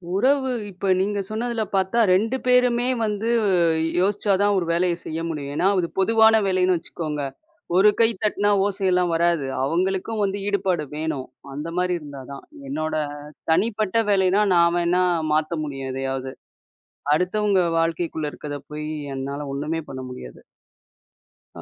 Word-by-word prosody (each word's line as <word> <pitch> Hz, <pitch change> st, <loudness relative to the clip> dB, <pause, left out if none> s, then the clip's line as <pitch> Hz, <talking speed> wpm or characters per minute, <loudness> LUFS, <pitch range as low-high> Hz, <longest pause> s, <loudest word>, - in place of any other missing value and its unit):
உறவு. 265 Hz, +5 st, +2 dB, 0.2 s
இப்ப 190 Hz, +2 st, -5 dB
நீங்க 205 Hz, +1 st, 0 dB
சொன்னதுல 230 Hz, +1 st, -2 dB
பாத்தா 190 Hz, +5 st, +1 dB
2 225 Hz, +7 st, +1 dB
பேருமே 250 Hz, -1 st, +3 dB, 0.2 s
வந்து, 210 Hz, +1 st, -2 dB, 0.7 s
யோசிச்சா 200 Hz, +1 st, +1 dB
தான் 205 Hz, 0 st, +3 dB
ஒரு 180 Hz, -, 0 dB
வேலைய 175 Hz, 0 st, +1 dB
செய்ய 160 Hz, +1 st, -4 dB
முடியும். 145 Hz, -3 st, -5 dB
ஏன்னா, 180 Hz, -, +2 dB
ஒரு 170 Hz, -, 0 dB
பொதுவான 220 Hz, +2 st, +5 dB
வேலைன்னு 185 Hz, -1 st, +2 dB
வச்சுக்கோங்க, 155 Hz, -3 st, -5 dB, 0.6 s
ஒரு 200 Hz, +3 st, +7 dB
கை 225 Hz, 0 st, +6 dB
தட்டுனா 205 Hz, -1 st, +2 dB
ஓசையெல்லாம் 185 Hz, -3 st, +1 dB
வராது. 170 Hz, -4 st, +2 dB, 0.2 s
அவங்களுக்கும் 190 Hz, +8 st, -1 dB
வந்து 200 Hz, 0 st, -1 dB
ஈடுபாடு 185 Hz, -6 st, 0 dB
வேணும். 155 Hz, -4 st, -3 dB, 0.3 s
அந்த 150 Hz, +4 st, -5 dB
மாரி 180 Hz, 0 st, +1 dB
இருந்தா 145 Hz, -3 st, -9 dB
தான். 140 Hz, -, -9 dB, 0.3 s
என்னோட 155 Hz, -, -2 dB, 0.6 s
தனிப்பட்ட 215 Hz, +4 st, +1 dB
வேலைனா 195 Hz, +1 st, +3 dB
நான் 170 Hz, 0 st, +4 dB
வேணா 175 Hz, +1 st, +2 dB, 0.3 s
மாத்த 155 Hz, +1 st, 0 dB
முடியும் 135 Hz, -3 st, -5 dB
எதையாவது, 135 Hz, 0 st, -3 dB, 0.8 s
அடுத்தவங்க 195 Hz, +3 st, +1 dB, 0.2 s
வாழ்க்கைக்குள்ள 165 Hz, -2 st, -1 dB
இருக்கத 145 Hz, -1 st, -6 dB
போயி 150 Hz, 0 st, -5 dB, 0.3 s
என்னால 140 Hz, +2 st, -4 dB
ஒண்ணுமே 155 Hz, +4 st, -3 dB
பண்ண 130 Hz, -, -6 dB
முடியாது. 60 Hz, -, -10 dB, 1.1 s
அ -, -, -9 dB
180 Hz, 135 wpm, -23 LUFS, 155-205 Hz, 1.1 s, ஒரு